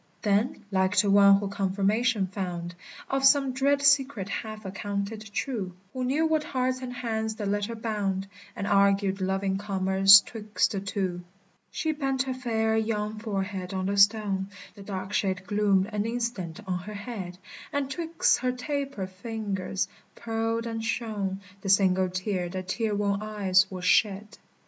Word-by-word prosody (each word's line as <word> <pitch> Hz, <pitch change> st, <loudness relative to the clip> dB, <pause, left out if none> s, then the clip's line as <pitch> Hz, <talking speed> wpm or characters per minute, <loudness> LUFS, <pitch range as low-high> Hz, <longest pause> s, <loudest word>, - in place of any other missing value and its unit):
Then, 210 Hz, +2 st, +1 dB
like 190 Hz, +1 st, +1 dB
to 200 Hz, -, +4 dB
one 200 Hz, 0 st, +7 dB
who 200 Hz, 0 st, -3 dB
confirmation 200 Hz, +3 st, +1 dB
found 180 Hz, -2 st, -5 dB, 0.3 s
Of 270 Hz, 0 st, -1 dB
some 275 Hz, -1 st, +5 dB
dread 280 Hz, +2 st, +1 dB
secret 275 Hz, -8 st, +3 dB
half 215 Hz, 0 st, -5 dB
accounted 200 Hz, +2 st, -4 dB
true, 200 Hz, -6 st, -3 dB, 0.2 s
Who 255 Hz, -, -3 dB
knew 280 Hz, +6 st, +1 dB
what 315 Hz, -1 st, +1 dB
hearts 255 Hz, -4 st, -1 dB
and 255 Hz, -1 st, -5 dB
hands 220 Hz, -3 st, -2 dB
the 210 Hz, -1 st, -4 dB
letter 205 Hz, +3 st, -1 dB
bound, 205 Hz, -4 st, -2 dB, 0.3 s
And 200 Hz, -, -3 dB
argued 200 Hz, -1 st, +3 dB
loving 190 Hz, +1 st, 0 dB
commerce 195 Hz, -1 st, +6 dB
'twixt 215 Hz, -1 st, -1 dB
the 200 Hz, -, -2 dB
two, 190 Hz, -2 st, -3 dB, 0.5 s
She 315 Hz, -, -1 dB
bent 270 Hz, -3 st, -1 dB
her 265 Hz, -1 st, -3 dB
fair 225 Hz, -3 st, 0 dB
young 215 Hz, -1 st, -1 dB
forehead 195 Hz, -3 st, -3 dB
on 185 Hz, 0 st, -1 dB
the 200 Hz, +1 st, 0 dB
stone; 200 Hz, -1 st, +3 dB, 0.2 s
The 205 Hz, -, -13 dB
dark 195 Hz, 0 st, -5 dB
shade 190 Hz, -2 st, 0 dB
gloomed 200 Hz, -1 st, +2 dB
an 210 Hz, +1 st, -1 dB
instant 230 Hz, -8 st, -3 dB
on 180 Hz, -2 st, -2 dB
her 210 Hz, +4 st, -8 dB
head; 200 Hz, -5 st, -6 dB, 0.3 s
And 285 Hz, -2 st, -1 dB
'twixt 330 Hz, +3 st, +1 dB
her 255 Hz, 0 st, 0 dB
taper 275 Hz, -4 st, -3 dB
fingers 195 Hz, -1 st, -3 dB, 0.3 s
pearled 225 Hz, 0 st, -2 dB
and 225 Hz, -1 st, -4 dB
shone 205 Hz, -4 st, -2 dB, 0.2 s
The 195 Hz, -, -4 dB
single 190 Hz, -1 st, +4 dB
tear 185 Hz, -1 st, -2 dB
that 185 Hz, 0 st, -6 dB
tear 220 Hz, -3 st, 0 dB
worn 200 Hz, 0 st, 0 dB
eyes 195 Hz, -3 st, +2 dB
will 185 Hz, -1 st, -6 dB
shed. 205 Hz, +2 st, +1 dB
205 Hz, 160 wpm, -27 LUFS, 190-230 Hz, 0.5 s, one